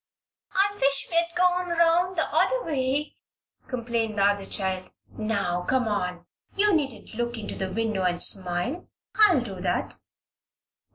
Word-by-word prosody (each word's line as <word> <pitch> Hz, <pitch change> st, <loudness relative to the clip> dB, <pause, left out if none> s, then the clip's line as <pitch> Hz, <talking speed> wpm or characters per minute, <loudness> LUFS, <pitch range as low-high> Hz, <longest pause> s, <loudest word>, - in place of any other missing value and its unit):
"I 400 Hz, +1 st, +4 dB
wish 275 Hz, 0 st, +2 dB
we'd 335 Hz, 0 st, +2 dB
gone 360 Hz, 0 st, +2 dB
'round 340 Hz, +2 st, +2 dB
the -, -, +2 dB
other -, -, +2 dB
way," 280 Hz, 0 st, -1 dB, 0.5 s
complained 235 Hz, -3 st, -2 dB
the 200 Hz, -, +3 dB
other 200 Hz, -1 st, +2 dB
child. 185 Hz, -1 st, -2 dB, 0.2 s
"Now, 200 Hz, -5 st, -1 dB
come 250 Hz, +5 st, 0 dB
on. 180 Hz, -4 st, -2 dB, 0.3 s
You 415 Hz, 0 st, +3 dB
needn't 270 Hz, -11 st, -2 dB
look 240 Hz, +1 st, -2 dB
into 215 Hz, -, -5 dB
the 190 Hz, -1 st, -4 dB
window 215 Hz, -1 st, -1 dB
and 175 Hz, -1 st, +1 dB
smile. 190 Hz, -, -1 dB, 0.3 s
I'll 405 Hz, -10 st, +5 dB
do 195 Hz, -6 st, -7 dB
that." 180 Hz, -1 st, -2 dB
235 Hz, 140 wpm, -26 LUFS, -, 0.5 s, I'll